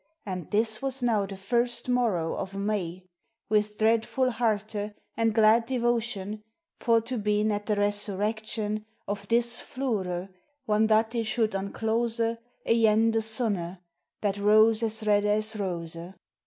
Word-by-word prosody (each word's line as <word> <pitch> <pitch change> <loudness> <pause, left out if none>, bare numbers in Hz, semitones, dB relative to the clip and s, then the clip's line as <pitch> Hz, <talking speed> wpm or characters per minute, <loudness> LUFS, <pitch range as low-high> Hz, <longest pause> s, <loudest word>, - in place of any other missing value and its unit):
And 185 -4 -5
this 220 +1 +1
was 270 -1 -2
now 215 -5 +2
the 195 0 -8
first 240 +6 -1
morow 225 -10 +1
of 195 +1 -5
May, 195 -3 -2 0.5
With 210 0 +1
dreadful* 230 +4 +2
herte, 215 -2 -1 0.2
and 225 -1 +2
glad 220 +1 +4
devotion 235 -4 -1 0.4
For 230 -2 +3
to 235 +1 -4
been 210 +1 +1
at 205 0 -3
the 210 - +2
resurrection 210 +1 -1 0.2
Of 200 0 -4
this 235 +1 +2
floure, 195 -8 -3 0.4
whan 215 0 +3
that 220 +1 +3
it 230 -2 -1
should 220 -1 +1
unclose 225 +4 -1 0.5
Againe 225 0 +4
the 225 0 +1
Sunne, 215 -6 -1 0.4
that 205 -1 -1
rose 215 +2 +5
as 220 -1 -1
redde 205 -1 +3
as 215 +1 +1
rose. 170 -5 -4
215 Hz, 140 wpm, -27 LUFS, 205-230 Hz, 0.5 s, rose